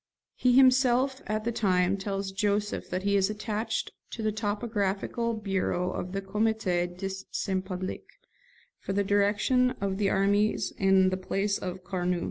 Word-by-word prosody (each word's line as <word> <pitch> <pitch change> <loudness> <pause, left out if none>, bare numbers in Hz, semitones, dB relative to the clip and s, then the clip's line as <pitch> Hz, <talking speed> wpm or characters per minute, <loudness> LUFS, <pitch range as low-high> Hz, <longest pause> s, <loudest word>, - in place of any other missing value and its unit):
He 250 -1 +2
himself 260 0 +4
at 215 0 -1
the 235 - -1
time 185 -4 +2
tells 195 0 -3
Joseph 205 +1 -1
that 185 +1 -2
he 200 0 +2
is 195 0 +3
attached 215 +1 -3 0.2
to 225 - -6
the 215 - +1
topographical 210 +1 -1
bureau 190 -3 -1
of 180 - -4
the 195 +1 -3
Comité 200 -3 0
de 195 +1 -3 0.2
Saint 190 -1 -2
Public, 185 -1 -5 0.7
for 195 - -4
the 200 +1 +2
direction 210 +6 +2
of 195 0 -2
the 200 -2 +2
armies 200 +2 +1
in 190 -1 +4
the 185 - -1
place 195 +2 -1
of 185 0 -5
Carnot. 180 -1 -1
200 Hz, 155 wpm, -28 LUFS, 190-215 Hz, 0.7 s, himself